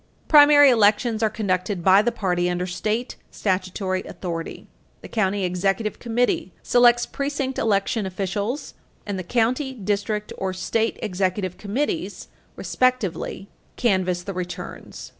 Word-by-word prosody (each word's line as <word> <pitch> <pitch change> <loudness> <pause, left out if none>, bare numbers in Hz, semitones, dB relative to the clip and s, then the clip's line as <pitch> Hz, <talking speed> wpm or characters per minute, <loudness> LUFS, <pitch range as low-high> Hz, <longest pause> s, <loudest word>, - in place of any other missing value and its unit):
Primary 290 -2 +8
elections 220 0 +3
are 220 - +3
conducted 190 -3 -2
by 190 +2 +6
the 240 +3 0
party 180 -6 0
under 180 0 -1
state 215 +7 -3
statutory 185 -1 -2
authority. 165 -3 -6 0.4
The - - -9
county 200 -3 0
executive 195 +4 -1
committee 235 -4 0
selects 240 0 +4
precinct 275 -2 -3
election 210 0 0
officials 200 +7 -3 0.3
and 200 -2 -3
the - - -4
county, 250 - 0
district 210 -1 -2
or 190 -1 -2
state 225 +5 -1
executive 185 -2 -2
committees, 205 - -3 0.3
respectively, 250 -6 -1 0.3
canvass 185 -6 +1
the 195 - -5
returns. 180 -1 -7
205 Hz, 120 wpm, -23 LUFS, 185-235 Hz, 0.4 s, Primary